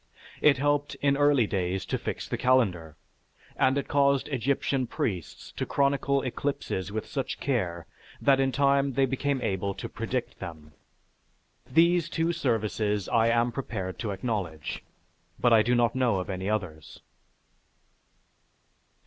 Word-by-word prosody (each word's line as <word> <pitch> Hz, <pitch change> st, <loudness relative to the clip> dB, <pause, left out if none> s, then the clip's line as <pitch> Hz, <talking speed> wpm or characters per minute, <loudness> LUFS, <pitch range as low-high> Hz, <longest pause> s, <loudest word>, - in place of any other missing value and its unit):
It 145 Hz, -3 st, +5 dB
helped 145 Hz, +1 st, 0 dB
in 140 Hz, -1 st, +4 dB
early 145 Hz, -4 st, +4 dB
days 95 Hz, -1 st, -2 dB
to -, -, -2 dB
fix -, -, -4 dB
the -, -, -2 dB
calendar, 90 Hz, -, +1 dB, 0.6 s
and 130 Hz, +1 st, +2 dB
it 140 Hz, -, -2 dB
caused 140 Hz, -1 st, +2 dB
Egyptian 135 Hz, 0 st, 0 dB
priests 95 Hz, -8 st, -4 dB
to -, -, -1 dB
chronicle 140 Hz, 0 st, +1 dB
eclipses 125 Hz, -7 st, -3 dB
with 110 Hz, +1 st, -3 dB
such 135 Hz, -3 st, -4 dB
care 90 Hz, -, -1 dB, 0.3 s
that 135 Hz, -1 st, +4 dB
in 135 Hz, 0 st, +2 dB
time 140 Hz, 0 st, +2 dB
they 135 Hz, +2 st, +3 dB
became 135 Hz, 0 st, -1 dB
able 100 Hz, 0 st, -1 dB
to -, -, -5 dB
predict 115 Hz, +3 st, -4 dB
them. 80 Hz, -5 st, -9 dB, 1.0 s
These 170 Hz, +4 st, +3 dB
two 165 Hz, +1 st, 0 dB
services 110 Hz, -, -1 dB
I 115 Hz, -1 st, +3 dB
am 120 Hz, +1 st, +2 dB
prepared 105 Hz, -8 st, -5 dB
to 110 Hz, -, -3 dB
acknowledge, 95 Hz, -7 st, -3 dB, 0.6 s
but 120 Hz, -1 st, +4 dB
I 110 Hz, -, +7 dB
do 120 Hz, +3 st, +2 dB
not 120 Hz, -1 st, +2 dB
know 125 Hz, -4 st, +2 dB
of 90 Hz, +2 st, -4 dB
any 95 Hz, +1 st, -3 dB
others. 90 Hz, -8 st, -4 dB
120 Hz, 140 wpm, -27 LUFS, 100-140 Hz, 1.0 s, I